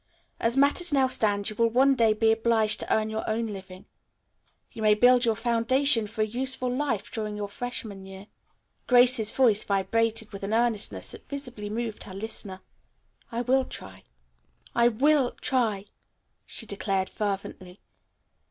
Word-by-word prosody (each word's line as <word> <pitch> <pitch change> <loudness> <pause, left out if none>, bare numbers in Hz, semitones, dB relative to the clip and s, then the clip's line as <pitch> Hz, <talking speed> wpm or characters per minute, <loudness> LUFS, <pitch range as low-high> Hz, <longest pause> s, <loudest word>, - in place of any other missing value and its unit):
As 235 +3 0
matters 290 +5 +3
now 275 -2 +3
stand 205 -5 0
you - - -9
will 230 +1 +2
one 265 +4 +4
day 230 -4 +3
be 220 +1 +2
obliged 225 -1 +2
to - - -5
earn 220 0 +1
your 220 0 -3
own 225 +1 -1
living. 185 -1 -11 0.9
You 225 - -9
must 210 -1 +3
build 245 +1 +5
your 225 -1 +2
foundation 235 +1 +2
for 215 +1 -2
a - - +1
useful 250 +2 -2
life 235 -6 -2
during 215 -2 -4
your 205 -1 -3
freshman 205 -3 -5
year." 195 +1 -11 0.6
Grace's 245 -3 +5
voice 230 -6 +3
vibrated 225 +3 -1
with 195 - -7
an 200 +3 -2
earnestness 215 - 0
that - - -11
visibly 250 -7 -6
moved 225 0 -4
her 190 - -10
listener. 195 -2 -6 0.7
"I 235 +1 -2
will 260 +2 +2
try. 95 - -11 0.7
I 235 0 +4
will 265 +2 +2
try," 220 -6 0 0.6
she 225 - -4
declared 195 -2 -2
fervently. 195 -2 -5
225 Hz, 155 wpm, -26 LUFS, 205-245 Hz, 0.9 s, build